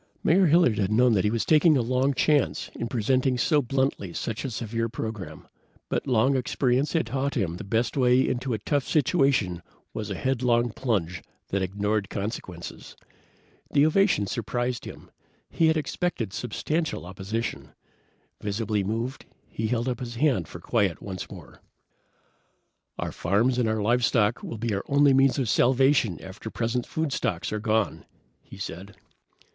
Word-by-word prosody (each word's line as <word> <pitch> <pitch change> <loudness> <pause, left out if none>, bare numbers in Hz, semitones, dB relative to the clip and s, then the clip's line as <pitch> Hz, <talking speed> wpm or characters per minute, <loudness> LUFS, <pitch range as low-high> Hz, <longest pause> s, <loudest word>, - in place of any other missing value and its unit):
Mayor 180 +3 +4
Hilliard 155 -9 +4
had 100 0 0
known 120 +1 +4
he 105 +2 +2
was 115 +1 -1
taking 155 -1 +5
a 125 - +1
long 130 +3 +1
chance 150 0 +1
in 115 - -4
presenting 130 +2 +1
so 145 +4 +3
bluntly 130 -8 -1
such 110 +4 -4
a 135 - -2
severe 115 0 -3
program, 110 -9 -6 0.4
but - - -2
long 130 +2 +3
experience 130 +1 +1
had 165 -5 +1
taught 135 +4 -2
him 90 -7 -1
the - - -7
best 110 +5 0
way 125 -1 +4
into 125 +1 -2
a - - -2
tough 140 +6 0
situation 135 - +1 0.3
was - - -4
a - - -3
headlong 120 -2 +1
plunge 95 -9 -2 0.3
that 100 - 0
ignored 100 +2 -1
consequences. 100 -4 -6 0.7
The 145 - +4
ovation 180 - +3
surprised 120 +3 -2
him. - - -11 0.4
He 165 - +3
had 160 0 +3
expected 150 - -2
substantial 150 - -2
opposition. 100 +5 -5 0.7
Visibly 105 0 -1
moved, 115 +6 -3 0.2
he 110 - -3
held 120 +1 -1
up 125 0 -2
his 120 -2 -6
hand 120 - +1
for 85 - -9
quiet 100 -1 0
once 95 -3 -6
more. - - -12 1.4
"Our - - -3
farms 115 +8 +1
and 115 -3 +2
our 110 -1 0
livestock 115 -1 +2
will 115 - -6
be 115 0 -2
our 100 - -2
only 140 0 +4
means 135 +1 +4
of 130 -4 0
salvation 125 - +3
after 95 +4 -8
present 120 +2 -2
food 160 -3 -2
stocks 90 -3 -2
are 105 - -1
gone," 110 0 0 0.4
he - - -13
said. 95 +1 -7
120 Hz, 160 wpm, -26 LUFS, 105-135 Hz, 1.4 s, taking